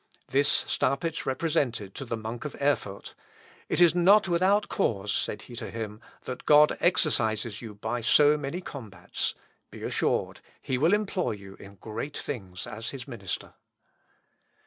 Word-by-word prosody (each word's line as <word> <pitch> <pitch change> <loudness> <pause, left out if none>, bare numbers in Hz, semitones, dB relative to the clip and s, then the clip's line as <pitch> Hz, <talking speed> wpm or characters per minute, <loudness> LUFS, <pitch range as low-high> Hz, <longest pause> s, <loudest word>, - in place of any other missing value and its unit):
This 140 +2 +3
Staupitz 160 +4 0
represented 130 - 0
to 135 - -6
the 115 -1 -3
monk 110 +2 -6
of 150 - -6
Erfurt; 140 -9 -1 0.6
"It - - 0
is 175 -2 +7
not 190 +4 +5
without 185 +4 +3
cause," 105 - 0
said 105 - -2
he 120 - -11
to 115 -2 -5
him, 110 -1 -6 0.2
"that 125 - -7
God 150 0 +7
exercises 115 - +1
you 110 -3 -8
by 110 +3 -3
so 145 +6 +6
many 150 +4 -4
combats; 110 - -4 0.3
be - - -10
assured - - 0 0.2
he 130 -1 -2
will 165 +8 +5
employ 195 - -1
you 100 -2 -10
in 100 0 -12
great 110 +8 -6
things 95 -9 -5
as 110 +2 -5
his 135 -2 -7
minister." 105 -9 -5
130 Hz, 150 wpm, -28 LUFS, 110-155 Hz, 0.6 s, is